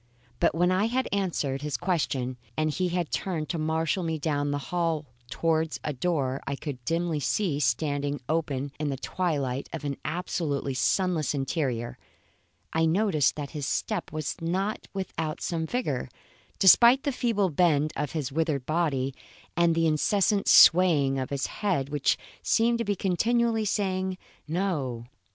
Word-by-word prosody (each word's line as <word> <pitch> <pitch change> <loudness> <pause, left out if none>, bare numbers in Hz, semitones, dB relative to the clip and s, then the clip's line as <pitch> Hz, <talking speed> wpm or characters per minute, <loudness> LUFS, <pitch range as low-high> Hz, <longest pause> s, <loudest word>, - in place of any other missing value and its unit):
But 170 - +2
when 175 +2 +3
I 185 +3 +2
had 250 +3 0
answered 165 -9 -1
his 150 -1 -2
question 140 -8 -1 0.2
and 155 0 +1
he 180 +4 -1
had 175 -2 -2
turned 165 -5 -2
to 170 - -2
marshal 160 +3 0
me 165 -2 -2
down 145 -2 -1
the 145 - 0
hall 165 -4 0 0.2
towards 160 -5 0
a 150 - -2
door 135 -2 -1
I 140 - -1
could 135 -4 -7
dimly 165 0 0
see 155 +1 0
standing 145 +2 0
open 145 -4 -1
in 150 -1 -1
the 135 - -2
twilight 140 -5 -2
of 165 - -6
an 140 -1 -2
absolutely 155 -5 -2
sunless 165 +2 +1
interior, 135 -4 -2 0.7
I 160 0 +3
noticed 170 -4 +2
that 145 -2 -5
his 145 -3 -4
step - - -2
was 155 -1 -3
not 190 +6 -2
without 170 -5 -4
some 160 -2 -2
vigour, 250 +5 -2 0.5
despite 235 +7 +7
the 285 - 0
feeble 225 -7 0
bend 155 -2 +2
of 150 -2 -3
his 145 -4 -2
withered 150 -3 -1
body 145 -5 0 0.4
and 170 0 +3
the 165 0 +2
incessant 195 +6 +2
swaying 155 -7 +6
of 130 - -3
his 140 -1 -1
head, 180 -10 -1
which 145 -1 +1 0.2
seemed 235 +1 +2
to - - +1
be 205 -2 -1
continually 225 +4 +1
saying 190 -2 -1 0.3
No! 150 -9 -2
160 Hz, 155 wpm, -27 LUFS, 145-185 Hz, 0.7 s, despite